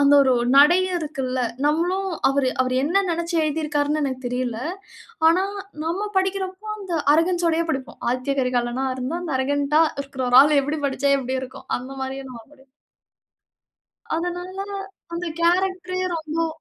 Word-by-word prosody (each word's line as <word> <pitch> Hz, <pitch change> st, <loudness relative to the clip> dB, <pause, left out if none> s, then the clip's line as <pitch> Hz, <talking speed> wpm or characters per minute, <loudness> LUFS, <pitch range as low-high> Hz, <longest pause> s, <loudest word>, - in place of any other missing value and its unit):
அந்த 285 Hz, 0 st, +6 dB
ஒரு 260 Hz, -1 st, +3 dB, 0.2 s
நடையும் 355 Hz, +6 st, +5 dB
இருக்கில்ல. 270 Hz, -5 st, -3 dB, 0.3 s
நம்மளும் 355 Hz, +6 st, +1 dB, 0.2 s
அவரு 270 Hz, -1 st, +1 dB
அவரு 255 Hz, 0 st, -1 dB
என்ன 375 Hz, +7 st, +2 dB
நெனச்சு 340 Hz, +1 st, -2 dB
எழுதியிருக்கிறார்ன்னு 300 Hz, -1 st, 0 dB
எனக்கு 260 Hz, -2 st, -2 dB
தெரியல. 245 Hz, -2 st, -2 dB, 0.7 s
ஆனா, 360 Hz, +3 st, +3 dB, 0.4 s
நம்ம 375 Hz, +6 st, -1 dB
படிக்கிறப்போ 380 Hz, +1 st, -1 dB
அந்த 380 Hz, -4 st, -5 dB, 0.2 s
அரகன்ஸ் 345 Hz, +2 st, +2 dB
ஓடையே 330 Hz, +1 st, 0 dB
படிப்போம். 265 Hz, -2 st, -5 dB
ஆதித்ய 255 Hz, +2 st, -1 dB
கரிகாலனா 250 Hz, 0 st, 0 dB
இருந்தா 265 Hz, +7 st, -3 dB
அந்த 320 Hz, -6 st, -3 dB
அரகன்ட்டா 285 Hz, +3 st, +2 dB, 0.2 s
இருக்கிற 275 Hz, -2 st, -4 dB
ஒரு 250 Hz, -, +8 dB
ஆள் 295 Hz, 0 st, +4 dB
எப்படி 295 Hz, +3 st, -2 dB
படிச்சா 280 Hz, +1 st, 0 dB
எப்படி 260 Hz, 0 st, -2 dB
இருக்கும்? 260 Hz, +1 st, -10 dB
அந்த 255 Hz, +2 st, -9 dB
மாரியே 265 Hz, +1 st, -5 dB
நம்ம 235 Hz, -2 st, -9 dB
படிப் 270 Hz, -1 st, -23 dB, 1.5 s
அதனால 355 Hz, +2 st, -4 dB, 0.6 s
அந்த 340 Hz, +1 st, -3 dB
கேரக்டரே 365 Hz, +1 st, +1 dB
ரொம்போ 320 Hz, 0 st, -1 dB
300 Hz, 140 wpm, -23 LUFS, 265-350 Hz, 1.5 s, ஒரு